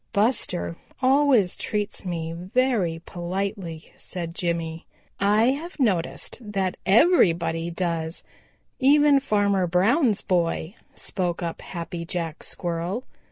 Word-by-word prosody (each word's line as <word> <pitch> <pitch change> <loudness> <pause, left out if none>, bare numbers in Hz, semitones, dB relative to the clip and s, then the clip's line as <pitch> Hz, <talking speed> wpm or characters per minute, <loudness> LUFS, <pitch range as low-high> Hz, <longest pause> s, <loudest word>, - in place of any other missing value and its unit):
"Buster 200 -6 0 0.2
always 260 -7 +4
treats 210 -2 -3
me 165 -2 -3
very 185 -2 0
politely," 180 -2 -4
said 170 -2 -6
Jimmy. 170 -2 -3 0.3
"I 210 +4 +4
have 325 +5 -6
noticed 195 -8 0
that 195 -4 -1
everybody 170 - +4
does, 165 -2 -2 0.6
even 290 +1 +5
Farmer 200 -7 +1
Brown's 210 - +3
boy," 170 -1 0 0.2
spoke 180 -2 -3
up 165 -1 -4
Happy 170 -1 -6
Jack 170 -2 -4
Squirrel. 175 +6 -3
185 Hz, 105 wpm, -25 LUFS, 170-225 Hz, 0.6 s, even